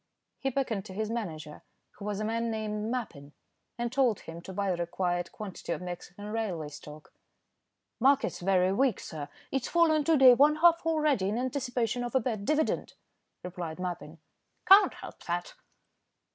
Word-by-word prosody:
He 270 - -1
beckoned 245 -7 -1
to 185 - -9
his 215 +1 -2
manager, 160 -10 -5 0.4
who 200 - -7
was 210 -1 -2
a 215 - -2
man 230 +1 -1
named 215 -1 -3
Mappin, 170 - -5 0.4
and 240 -1 -2
told 255 -5 +2
him 165 +1 -9
to 190 - -9
buy 195 0 -1
the 175 - -1
required 175 0 -2
quantity 205 -4 -5
of - - -6
Mexican 180 +2 -8
railway 190 -9 -3
stock. 150 +1 -12 0.9
"Market's 270 +3 +3
very 185 0 +2
weak, 260 +3 +2
sir. 150 -3 -7 0.2
It's 270 -3 -1
fallen 320 -3 +3
to 325 -2 +4
day 260 -2 +9
one 290 +4 +5
half 335 +1 +4
already 300 -11 +2
in 215 - -1
anticipation 245 -2 -1
of 240 +2 -5
a - - +6
bad 220 -4 -3
dividend," 305 +4 0 0.5
replied 175 -3 -6
Mappin. 175 -3 -5 0.5
"Can't 390 +2 +7
help - - -10
that." 175 0 -3
215 Hz, 165 wpm, -29 LUFS, 180-260 Hz, 0.9 s, day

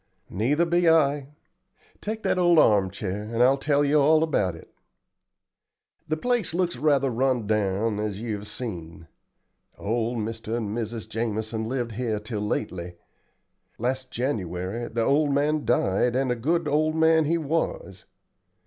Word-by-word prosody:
"Neither 135 - +1
be 170 0 +3
I. 145 -3 +3 0.7
Take 220 +1 -4
that - - +1
old 175 -1 +4
arm 100 -9 +5
chair, 100 +1 -4
and 115 +1 +2
I'll 135 +2 +4
tell 145 0 +2
you 150 +1 +3
all 155 +2 +5
about 100 - 0
it. 80 - -15 1.3
The 155 - -1
place 240 -2 -1
looks 180 -3 0
rather 140 0 +2
run 125 -1 +1
down, 105 0 0
as 105 -2 -3
you 115 -1 -3
have 105 +1 -9
seen. 85 -10 -6 0.7
Old 115 +3 -1
Mr. 110 +1 -3
and 110 -2 -3
Mrs. 115 -1 -4
Jamison 110 0 -3
lived 120 -2 -2
here 110 -1 -2
till 105 0 -5
lately. 90 -4 -3 0.8
Last 130 +2 -2
January 105 -3 -3
the 115 0 -1
old 145 +2 +2
man 150 +1 +1
died, 120 +1 +2
and 130 -1 +1
a - - +1
good 160 +7 0
old 155 +2 +1
man 160 0 +4
he 165 +3 +1
was. 165 - -3
125 Hz, 150 wpm, -25 LUFS, 110-150 Hz, 1.3 s, arm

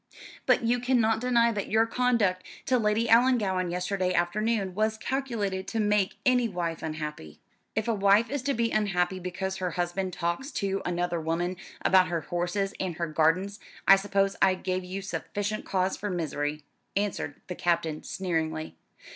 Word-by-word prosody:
But - - +4
you 240 +2 +2
cannot 235 -3 +2
deny 235 -2 +3
that 205 -3 -3
your 220 +1 +4
conduct 230 -6 +1 0.2
to 255 -2 +2
Lady 215 +1 +1
Ellangowan 225 -7 +3
yesterday 180 +1 -1
afternoon 200 +2 0
was 215 +2 0
calculated 220 -8 -2
to 225 - -2
make 210 -2 +2
any 250 -3 +3
wife 170 -4 -3
unhappy." 150 - -6 0.4
"If 220 +1 0
a 230 - +2
wife 200 +2 +4
is 285 -2 -1
to 275 - +2
be 230 0 +1
unhappy 190 -3 +1
because 190 +1 -4
her 180 -1 -1
husband 180 +1 -1
talks 170 +13 -2
to 195 0 -1
another 175 -1 -1
woman 170 +3 -1 0.3
about 185 -1 +5
her 170 -2 -1
horses 175 +4 -2
and 185 -3 -2
her 170 - -1
gardens, 165 +6 +1 0.3
I 195 - +10
suppose 195 0 +1
I 190 -1 +5
gave 185 0 -2
you 190 +2 -5
sufficient 205 +2 -3
cause 190 0 0
for 205 - -4
misery," 150 -4 -2 0.3
answered 200 -8 -2
the 180 - -5
Captain 165 -3 0
sneeringly. 160 -4 -3
190 Hz, 165 wpm, -28 LUFS, 175-220 Hz, 0.4 s, I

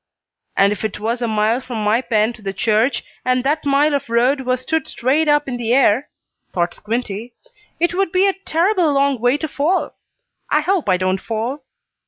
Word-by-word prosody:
"And 195 +1 +4
if 210 - -8
it 215 -1 -3
was 230 +3 -2
a 235 - 0
mile 220 +3 +1
from 235 -4 -5
my 215 +4 +2
pen 230 -2 +1
to 230 - -15
the 195 -1 -4
church, 220 +6 +1 0.2
and 255 0 +1
that 295 +2 0
mile 285 +2 +3
of 280 -4 -2
road 250 +4 +2
was 255 -1 -1
stood 315 +4 -1
straight 290 +5 0
up 295 -1 +3
in 250 -2 -3
the 240 0 0
air," 260 0 +3 0.4
thought 175 -1 -1
Squinty, 225 +1 -4 0.4
"it 345 +1 +1
would 385 -1 0
be 370 +1 +3
a 395 - +3
terrible 360 -2 +1
long 275 -2 +2
way 245 +4 +2
to 315 - -3
fall. 305 +6 0 0.6
I - - +3
hope 370 - 0
I 185 - +4
don't 185 +1 -1
fall." 235 +6 -3
250 Hz, 200 wpm, -19 LUFS, 220-295 Hz, 0.6 s, And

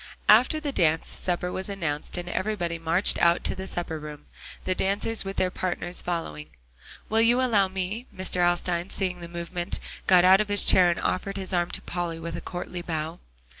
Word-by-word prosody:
After 250 +8 +6
the 295 -2 -3
dance, 160 - +1
supper 180 0 -2
was 190 +2 -5
announced, 165 -6 -3
and 175 0 -5
everybody 175 -3 -2
marched 165 +4 +4
out 170 0 +3
to - - 0
the 190 0 -6
supper 165 -4 -3
room; 150 -1 -9 0.4
the 185 - 0
dancers 200 +4 0
with 195 0 -5
their 185 - +1
partners 180 -1 -2
following. 75 - -4 0.6
"Will 220 +1 +2
you 235 +2 +4
allow 220 -7 +3
me?" 190 +6 -4
Mr. 185 -1 -1
Alstyne 175 0 0
seeing 185 -2 -2
the 170 - -8
movement, 170 +1 -4 0.3
got 180 -1 +6
out 190 +2 +7
of 210 - -3
his 205 -1 +2
chair 180 -2 +6
and 170 - -1
offered 195 +2 -2
his 190 0 -5
arm 175 -1 +1
to - - -4
Polly 175 -2 -4
with 165 +1 -5
a - - -6
courtly 175 0 -5
bow. 160 0 -4
180 Hz, 195 wpm, -26 LUFS, 170-195 Hz, 0.6 s, out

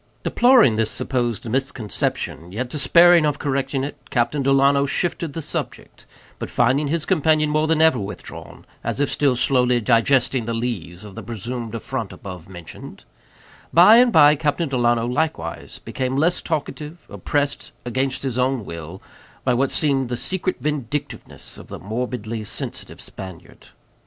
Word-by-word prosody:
Deploring 240 - +5
this 110 -1 +1
supposed 120 -4 -2
misconception, 110 - -3
yet 120 +6 -3
despairing 170 +4 +5
of 150 -1 +1
correcting 135 -1 -1
it, 140 - -4
Captain 120 +4 0
Delano 140 +1 +3
shifted 170 0 -2
the 165 - -5
subject; - - -6 0.3
but - - -5
finding 130 +5 +2
his 155 +1 -1
companion 155 -3 +2
more 155 +1 +1
than 160 0 +3
ever 160 -6 +4
withdrawn, 100 0 -8 0.2
as - - -2
if 145 - +1
still 140 -3 +2
sourly 125 -1 +2
digesting 120 +1 +2
the 115 0 -2
lees 105 -6 -4
of 100 - -10
the - - -7
presumed 115 +1 -5
affront 115 - -4
above 90 -3 -10
mentioned, 90 -3 -10 0.7
by 185 +7 +8
and 245 0 +5
by 150 -5 +7
Captain 150 +2 -1
Delano 120 -3 +1
likewise 120 - -3
became 130 0 -3
less 165 +6 +2
talkative, 155 +1 -5
oppressed, 145 -2 -2
against 130 +3 -2
his 130 -2 -2
own 125 -3 0
will, 85 +2 -8 0.4
by 125 - +2
what 130 +2 +1
seemed 135 -5 0
the 120 - -2
secret 185 +7 -2
vindictiveness 145 -1 -5
of - - -12
the - - -7
morbidly 110 +1 -4
sensitive 105 - -5
Spaniard. 95 -3 -10
130 Hz, 150 wpm, -22 LUFS, 115-150 Hz, 0.7 s, by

